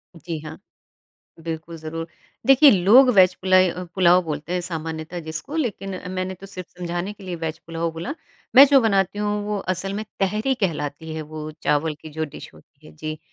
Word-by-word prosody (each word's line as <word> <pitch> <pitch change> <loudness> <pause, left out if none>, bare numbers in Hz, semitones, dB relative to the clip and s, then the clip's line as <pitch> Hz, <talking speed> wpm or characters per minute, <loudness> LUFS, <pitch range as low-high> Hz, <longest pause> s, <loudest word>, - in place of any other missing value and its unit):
जी 165 0 -5
हाँ, 155 +1 -9 0.8
बिल्कुल, 165 0 -6
ज़रूर। 165 +1 -6 0.4
देखिए, 270 +2 +8
लोग 215 +7 +6
वेज़ 185 -2 +6
पुलइ 185 0 +5
अ, 180 - -6
पुलाव 180 -1 +5
बोलते 155 +1 -4
हैं 180 - 0
सामान्यतः 160 0 -5
जिसको 160 - -6
लेकिन 195 - -3
मैंने 185 0 -3
तो 190 +2 -12
सिर्फ़ 185 -2 -9
समझाने 175 +3 -3
के 200 -1 -14
लिए 180 -1 -4
वेज़ 160 -1 -4
पुलाव 165 0 -2
बोला, 170 - -5 0.4
मैं 270 +2 +11
जो 275 -1 +6
बनाती 200 -3 +1
हूँ 210 0 -1
वो 210 -1 -1 0.2
असल 195 +2 -4
में 215 +2 -3 0.2
तहरी 210 +7 +1
कहलाती 160 -3 -2
है 160 - -4
वो 155 0 -7
चावल 150 +1 +1
की - - -10
जो 160 +1 -3
डिश 145 - -10
होती 140 - -20
है, - - -14
जी। 155 0 -6
175 Hz, 190 wpm, -23 LUFS, 160-195 Hz, 0.8 s, मैं